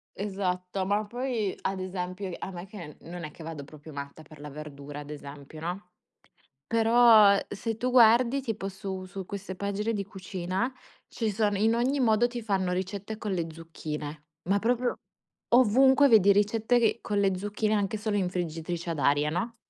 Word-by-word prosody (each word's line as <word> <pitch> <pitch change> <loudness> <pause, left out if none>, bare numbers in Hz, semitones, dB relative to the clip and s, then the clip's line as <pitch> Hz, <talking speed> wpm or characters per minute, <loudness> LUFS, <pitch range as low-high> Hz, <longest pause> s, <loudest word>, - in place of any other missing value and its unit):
Esatto, 190 -1 -2
ma 205 +2 +1
poi 235 -3 -2
ad 190 0 -2
esempio, 185 +1 -4
ehm, 175 - -5
a 190 - -5
me, 175 +1 -7
che 180 -7 -10
non 175 0 -8
è 150 - -6
che 160 - -12
vado 160 -3 -6
proprio 150 +1 -12
matta 140 +2 -7
per 155 -1 -15
la 150 0 -8
verdura, 145 0 -8
ad 145 0 -9
esempio, 145 +1 -9
no? 180 +2 -5 0.8
Però 225 -3 +6
se 220 +2 -4
tu 250 - -1
guardi 240 +2 +6
tipo 215 -5 -3
su 190 -1 -6
su 190 +1 -7
queste 195 0 -6
pagine 200 +3 -2
di 200 -1 -1
cucina, 190 +3 -3 0.4
ci 225 -3 -2
son 205 0 +1
in 220 +3 +3
ogni 260 +4 +1
modo 235 -1 +4
ti 240 -1 -6
fanno 190 -4 0
ricette 200 +3 -4
con 210 -3 -4
le 170 -3 -1
zucchine, 155 -2 -7 0.2
ma 200 +1 +3
proprio 245 +2 +1 0.6
ovunque 265 +4 +6
vedi 205 -3 +7
ricette 215 +4 +2
che 230 0 +2
con 205 -1 -1
le 195 -2 +2
zucchine 210 +2 -1
anche 205 +1 0
solo 210 0 -1
in 185 -3 0
friggitrice 170 -1 -4
ad 155 - -4
aria, 145 +1 +3
no? 225 +8 -2
195 Hz, 180 wpm, -28 LUFS, 175-220 Hz, 0.8 s, vedi